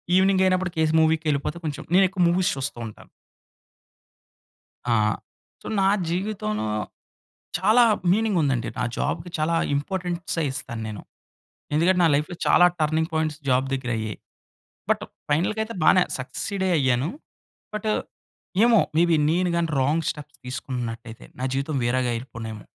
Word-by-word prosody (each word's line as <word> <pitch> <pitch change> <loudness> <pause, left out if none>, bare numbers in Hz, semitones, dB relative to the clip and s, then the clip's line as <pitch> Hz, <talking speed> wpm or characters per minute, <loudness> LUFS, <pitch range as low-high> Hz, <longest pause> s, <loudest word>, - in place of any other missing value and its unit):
ఈవెనింగైనప్పుడు 185 -1 +3
case 160 -1 +2
మూవీ‌కెళ్ళిపోతే 155 -1 +1
కొంచెం 145 -2 -4
నేను 195 +1 +7
ఎక్కువ 185 -1 0
మూవీస్ 175 +1 +2
చూస్తూ 135 -1 -4
ఉంటాను. 105 - -13 1.8
ఆ! - - +4 0.7
సో, - - -9
నా 190 - +4 0.2
జీవితంలో 175 - -2 0.9
చాలా 215 +6 +5 0.3
మీనింగ్ 215 -2 +2
ఉందండి. 130 -5 0
నా 125 - +1
జాబ్‌కి 175 - -2
చాలా 155 +2 +1 0.2
ఇంపార్టెన్సే 175 +2 -2
ఇస్తాను 115 -3 -5
నేను. 105 -1 -7 0.7
ఎందుకంటే, 180 +4 +3
నా 165 - +5
లైఫ్‌లో 150 +4 -2
చాలా 175 - +6
టర్నింగ్ 160 +1 +1
పాయింట్స్ 155 -1 -1
జాబ్ 130 +1 +3
దగ్గరయ్యాయి. 115 -5 -2 0.7
బట్ - - +2 0.3
ఫైనల్‌గా 185 +9 +1
అయితే 230 +1 -8
బానే 185 +3 +6 0.2
సక్సీడే 190 +9 -2
అయ్యాను. 130 0 +2 0.7
బట్ 215 +1 -1 0.7
ఏమో, 235 -2 +6 0.2
మేబి 170 0 +4 0.2
నేను 180 +2 +1
గాని 170 -1 +1
రాంగ్ 150 +5 +1
స్టెప్స్ 150 0 -9
తీసుకున్నట్టైతే. 120 -2 -5
నా - - -1
జీవితం 140 +2 -1
వేరేగా 125 +1 +1
అయిపోనేమో. 110 -3 -7
155 Hz, 125 wpm, -24 LUFS, 130-185 Hz, 1.8 s, నేను